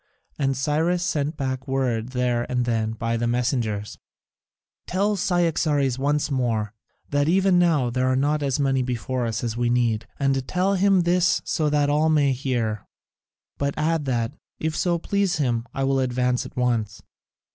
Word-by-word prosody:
And 135 -2 0
Cyrus 160 +5 +1
sent 155 -3 -1
back 130 0 -3
word 125 -4 -1
there 125 -2 -1
and 125 -1 0
then 110 -2 0
by 115 +1 -2
the 120 +1 -1
messengers: 120 -4 -1 0.9
"Tell 200 +3 +1
Cyaxares 155 -8 +1
once 145 +2 0
more, 115 -5 -1 0.4
that 145 0 +2
even 190 0 +4
now 155 -8 +2
there 130 +1 0
are 130 - +2
not 145 +3 +1
as 140 -1 0
many 135 -2 +2
before 125 0 -2
us 115 +1 -3
as 115 -2 -2
we 120 0 0
need. 115 -2 +1
And 135 -2 0
tell 185 +2 +1
him 195 -1 +3
this 175 +1 +2
so 155 -3 0
that 145 -1 +2
all 155 +2 +2
may 145 -3 +3
hear. 120 -5 -2 0.7
But 140 0 -1
add 155 0 0
that, 120 -2 -1 0.3
if 160 0 -2
it - - -4
so 175 -1 +1
please 200 +2 0
him, 120 -5 -1
I 135 - -3
will 135 0 +2
advance 125 -1 0
at - - -17
once." 115 -4 -1
135 Hz, 170 wpm, -24 LUFS, 120-155 Hz, 0.9 s, even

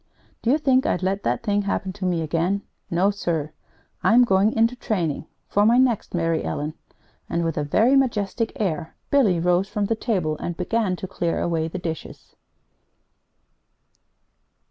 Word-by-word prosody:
Do 230 - 0
you 280 - +5
think 265 -4 +2
I'd 180 - 0
let 195 +2 0
that - - -1
thing 205 -2 +1
happen 195 -1 -2
to 195 -1 -5
me 175 -3 0
again? 170 +6 0 0.3
No, 185 +4 +2
sir! 165 -6 -2 0.5
I'm 245 +2 +5
going 195 -1 +3
into 230 +2 +2
training 175 - -2 0.2
for 205 - +2
my 230 +3 +5
next 250 -7 +1
Mary 165 -1 0
Ellen!" 150 +2 -3 0.6
And 170 0 0
with 165 -1 -1
a 150 - -1
very 225 - +3
majestic 230 -4 +1
air 165 -6 -2 0.2
Billy 220 -12 +4
rose 180 +3 +2
from 205 -1 -1
the 225 - 0
table 180 -9 -1
and 175 -1 -4
began 195 +1 0
to 190 - -6
clear 170 -3 -2
away 165 -2 0
the 165 - -5
dishes. 165 -3 -7
190 Hz, 165 wpm, -23 LUFS, 170-225 Hz, 0.6 s, you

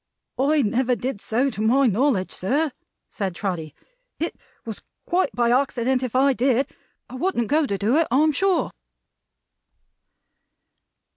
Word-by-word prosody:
"I 290 +2 +3
never 245 +3 +1
did 240 -1 -4
so 255 +5 0
to 210 - -5
my 255 +6 +4
knowledge, 230 -3 +1
sir," 285 - 0 0.4
said 190 -4 -4
Trotty. 165 -6 -4 0.4
"It 330 - -3 0.3
was 225 -2 -6 0.2
quite 360 -4 +1
by 240 -1 +2
accident 255 -1 +1
if 255 -2 -4
I 270 +1 +4
did. 260 +1 +1 0.4
I - - -13
wouldn't 255 - -1
go 300 +1 +2
to 200 - -1
do 220 +8 +2
it, 330 - +3
I'm 300 +5 +4
sure." 375 +4 +1
255 Hz, 140 wpm, -23 LUFS, 220-280 Hz, 0.4 s, my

